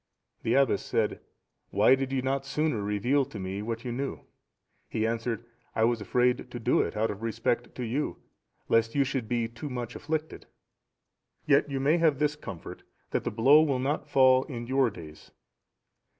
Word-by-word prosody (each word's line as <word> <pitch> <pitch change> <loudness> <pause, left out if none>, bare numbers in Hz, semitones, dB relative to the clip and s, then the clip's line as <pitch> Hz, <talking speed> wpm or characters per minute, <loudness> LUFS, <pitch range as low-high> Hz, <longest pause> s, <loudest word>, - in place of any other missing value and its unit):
" - - -49
The 115 - +1
abbess 135 -7 +3
said, 110 -2 0 0.5
"Why - - +5
did 135 0 0
you 130 -1 0
not 135 +1 0
sooner 135 -4 -1
reveal 105 +8 +1
to 115 - -10
me 95 +1 -4
what 115 +2 -4
you 120 - -2
knew?" 135 +3 -4 0.7
He 110 - -1
answered, 115 0 -2 0.3
"I 110 - +2
was 115 -1 +2
afraid 125 +4 +1
to 120 - -6
do 115 - +2
it, - - -3
out 110 +1 +1
of 105 +1 -8
respect 115 +1 -1
to 125 - -4
you, 130 +6 -2 0.5
lest 115 +1 +2
you 140 - +4
should 130 -4 -3
be 120 -2 0
too 120 +6 -7
much 120 -2 -5
afflicted; 155 +1 -4 1.0
yet 145 0 +3
you 135 -1 -2
may 145 +5 +3
have 160 -4 +3
this 150 +1 +1
comfort, 100 - -9 0.3
that - - -1
the - - +1
blow 135 +8 +6
will 145 -4 +1
not 135 +4 -2
fall 130 -1 +5
in 120 -4 -6
your 130 0 +2
days." 80 -7 -12
125 Hz, 185 wpm, -28 LUFS, 115-140 Hz, 1.0 s, blow